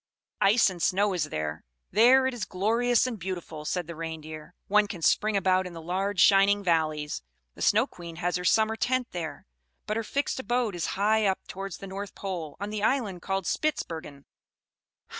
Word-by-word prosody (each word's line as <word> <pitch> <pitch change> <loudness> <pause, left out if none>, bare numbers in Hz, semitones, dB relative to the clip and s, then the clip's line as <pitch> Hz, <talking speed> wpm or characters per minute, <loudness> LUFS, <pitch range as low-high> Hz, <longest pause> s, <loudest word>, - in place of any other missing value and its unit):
"Ice 220 +4 +5
and 175 -2 -9
snow 200 +3 +2
is 175 -5 0
there! 75 - -4 0.3
There 250 +6 +6
it 260 - 0
is, 240 - -4
glorious 230 +6 +2
and 240 -4 -4
beautiful!" 175 -4 -6
said 180 +2 -1
the 170 +1 -8
Reindeer. 155 -1 -7
"One 210 +1 +4
can 175 -5 -7
spring 215 +4 +3
about 185 -1 +2
in 180 - -9
the 165 - -8
large 185 +4 -2
shining 200 +2 +5
valleys! 155 -4 0 0.3
The - - -13
Snow - - +4
Queen 170 -2 -10
has 180 +1 -1
her 180 - -5
summer 220 +4 +3
tent 255 +2 0
there; 160 -5 -5 0.4
but 215 - -2
her 225 - -1
fixed 280 +5 -2
abode 240 -2 0
is 175 -2 -2
high 215 +1 +3
up 190 - -1
towards 195 -2 -6
the - - -9
North 195 +1 -7
Pole, 175 -7 -5
on 205 +2 -4
the 215 -1 -3
Island 215 -6 0
called 195 0 -2
Spitzbergen." 160 - -3
195 Hz, 185 wpm, -27 LUFS, 170-215 Hz, 0.4 s, There